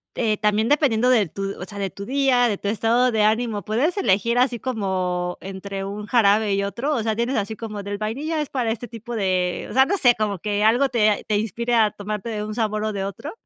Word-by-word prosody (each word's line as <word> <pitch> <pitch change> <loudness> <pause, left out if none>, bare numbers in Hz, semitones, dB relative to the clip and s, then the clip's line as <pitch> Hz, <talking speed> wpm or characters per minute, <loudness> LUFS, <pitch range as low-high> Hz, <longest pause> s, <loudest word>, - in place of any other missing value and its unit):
eh, 215 -3 +1
también 210 +1 +1
dependiendo 255 -5 +3
de 225 -6 +4
tu, 195 +4 -5
o - - -4
sea, 205 - -10
de 195 -1 -1
tu 200 - -8
día, 260 -2 +3
de 205 -3 -1
tu 200 - -3
estado 230 +4 +2
de 215 -1 +2
ánimo, 220 -1 +1
¿puedes 260 - 0
elegir 230 - +2
así 250 -2 +2
como 185 -7 -2
entre 195 0 -6
un 205 +1 -6
jarabe 210 -2 +3
y 200 - 0
otro?, 250 +9 -2
o 230 - -1
sea, 220 -1 0
tienes 235 +4 -1
así 215 +2 -2
como 210 -3 -6
del 200 0 -4
vainilla 290 +9 -2
es 300 - -4
para 240 -4 -1
este 235 +2 -5
tipo 230 +2 -8
de 185 -4 0
o - - -7
sea, 265 +1 +5
no 400 +5 0
sé 245 -6 +4
como 210 -3 -1
que 205 +2 -1
algo 240 +6 +4
te 215 -4 +3
a 205 - -1
te 210 -1 0
inspire 235 +3 -1
a 220 -2 +4
tomarte 210 +2 -5
de 210 -2 -3
un 215 0 -5
sabor 215 -2 -1
o 215 - -2
de 195 - -3
otro. 200 - -6
215 Hz, 245 wpm, -22 LUFS, 200-240 Hz, -, sea